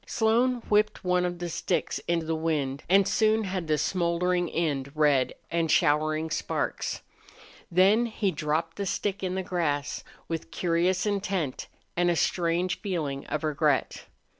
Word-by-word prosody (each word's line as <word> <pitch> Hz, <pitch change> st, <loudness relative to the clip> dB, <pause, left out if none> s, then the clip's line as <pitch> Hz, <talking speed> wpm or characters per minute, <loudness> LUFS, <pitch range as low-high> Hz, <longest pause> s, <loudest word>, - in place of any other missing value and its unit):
Slone 240 Hz, +2 st, +2 dB
whipped 210 Hz, 0 st, +2 dB
one 180 Hz, 0 st, +2 dB
of 175 Hz, 0 st, -3 dB
the 175 Hz, 0 st, -4 dB
sticks 165 Hz, -, -1 dB
in 170 Hz, -1 st, 0 dB
the 160 Hz, -, -1 dB
wind 150 Hz, -4 st, -1 dB
and 195 Hz, +1 st, +5 dB
soon 220 Hz, +1 st, +2 dB
had 185 Hz, -4 st, -3 dB
the 155 Hz, -1 st, +2 dB
smouldering 175 Hz, +2 st, 0 dB
end 145 Hz, -5 st, -1 dB
red 145 Hz, -4 st, +3 dB, 0.2 s
and 165 Hz, -1 st, 0 dB
showering 155 Hz, +2 st, +2 dB
sparks. -, -, -2 dB, 0.7 s
Then 200 Hz, +7 st, +4 dB
he 215 Hz, -3 st, -1 dB
dropped 160 Hz, +1 st, -2 dB
the 200 Hz, -1 st, -2 dB
stick 200 Hz, +2 st, -2 dB
in 185 Hz, -1 st, -2 dB
the 190 Hz, -, -2 dB
grass, 160 Hz, -6 st, -2 dB, 0.2 s
with 165 Hz, -1 st, -4 dB
curious 180 Hz, +2 st, +1 dB
intent 195 Hz, -8 st, -2 dB, 0.3 s
and 175 Hz, 0 st, +2 dB
a 170 Hz, -, +2 dB
strange 175 Hz, +2 st, 0 dB
feeling 155 Hz, -9 st, -3 dB
of 155 Hz, -, -3 dB
regret. 150 Hz, -2 st, 0 dB
170 Hz, 150 wpm, -27 LUFS, 155-190 Hz, 0.7 s, and